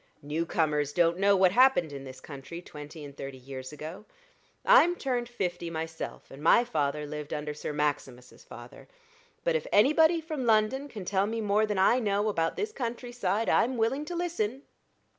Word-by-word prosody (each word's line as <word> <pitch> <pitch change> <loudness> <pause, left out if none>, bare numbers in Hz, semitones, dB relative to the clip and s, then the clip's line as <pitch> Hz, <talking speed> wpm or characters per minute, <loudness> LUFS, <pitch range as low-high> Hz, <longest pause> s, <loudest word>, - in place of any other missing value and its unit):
"New 155 +3 -2
comers 150 -3 0
don't 170 0 +2
know 200 0 +4
what 185 -1 +4
happened 245 - +4
in 135 -1 -7
this 130 0 -10
country 140 +4 -9
twenty 150 -2 -10
and 140 -1 -11
thirty 135 -1 -7
years 130 +1 -8
ago. 155 +6 -8 0.6
I'm 350 -9 +6
turned 245 -6 -2
fifty 180 -7 -3
myself, 160 0 -6
and 135 - -11
my 170 +9 +5
father 150 -8 -1
lived 150 0 -7
under 150 0 -3
Sir 150 - -5
Maximus's 145 -4 -3
father. - - -12 0.6
But - - +1
if 480 - -1
anybody 315 +9 +5
from 310 -4 -4
London 225 +6 +2
can 210 -9 -8
tell 195 +1 +1
me 225 +1 -3
more 215 0 +2
than 210 -2 -2
I 210 +6 +4
know 205 -2 +1
about 165 -5 0
this 425 +1 -2
country 240 - -5
side, 220 -2 -1
I'm 255 +1 +2
willing 235 +6 0
to 350 - -5
listen." 285 -8 -2
190 Hz, 180 wpm, -28 LUFS, 150-240 Hz, 0.6 s, I'm